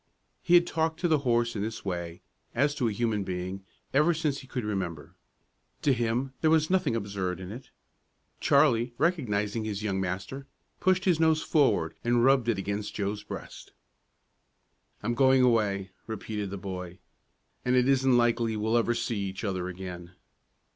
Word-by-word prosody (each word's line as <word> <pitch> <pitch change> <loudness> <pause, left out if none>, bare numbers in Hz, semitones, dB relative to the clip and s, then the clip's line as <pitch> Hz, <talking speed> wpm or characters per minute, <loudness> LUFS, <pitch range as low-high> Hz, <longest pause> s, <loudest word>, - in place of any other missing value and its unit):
He 175 - +4
had 175 0 +6
talked 160 -1 -1
to 175 - +2
the 155 -3 +3
horse 120 -3 +1
in 100 - -2
this 110 0 -4
way, 85 -2 -4 0.3
as 145 +1 +2
to 130 -5 0
a - - 0
human 105 -1 0
being, 95 +1 -4 0.3
ever 155 +5 +4
since 150 -3 -1
he 135 - -12
could 125 -2 -4
remember. 90 -7 -4 0.7
To 140 - +4
him 120 +2 -1
there 160 - +4
was 160 +1 +3
nothing 185 -11 +2
absurd 100 -4 -3
in 95 0 -7
it. 125 +5 -9 0.7
Charlie, 125 -4 +3
recognizing 115 - 0
his 105 -1 -4
young 95 -3 -1
master, 95 +9 -4 0.3
pushed 185 0 +2
his 175 -4 +3
nose 160 -1 +3
forward 110 - +2
and 120 0 +3
rubbed 130 -3 +4
it 115 - +1
against 100 +2 -3
Joe's 105 +1 -2
breast. 105 - -9 1.3
"I'm 120 +3 0
going 130 +1 +4
away," 100 -5 +2 0.2
repeated 105 -2 -4
the 100 - -5
boy, 90 -2 -6 0.7
"an' 125 0 +2
it 125 0 +4
isn't 135 -2 +4
likely 115 -2 +2
we'll 110 +2 +1
ever 120 0 +1
see 115 -2 -2
each 95 0 -4
other 95 -3 -2
again." 90 -1 -8
115 Hz, 170 wpm, -28 LUFS, 100-135 Hz, 1.3 s, had